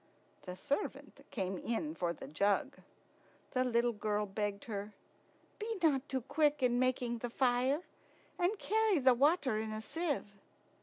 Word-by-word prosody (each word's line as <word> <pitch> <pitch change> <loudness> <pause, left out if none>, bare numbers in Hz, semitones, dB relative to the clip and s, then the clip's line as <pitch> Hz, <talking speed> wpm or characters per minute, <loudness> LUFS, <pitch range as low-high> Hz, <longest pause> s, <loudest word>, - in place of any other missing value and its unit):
The 180 - -4
servant 280 - -3
came 190 -3 -2
in 300 +7 -2
for 175 - -1
the 170 - -8
jug. 200 - +1 0.7
The 255 - +2
little 240 -1 +2
girl 210 -1 -1
begged 205 0 -3
her, 205 -2 -5 0.7
"Be 440 +1 -3
not 290 -3 +3
too 265 -1 -1
quick 295 +2 +1
in 245 -1 +3
making 250 -2 +1
the 245 - -3
fire, 255 +5 +2 0.6
and 365 +5 +2
carry 435 -1 +2
the 260 -3 +6
water 275 -3 +3
in 220 0 -3
a 215 - -3
sieve." 305 +7 -2
250 Hz, 150 wpm, -34 LUFS, 215-295 Hz, 0.7 s, the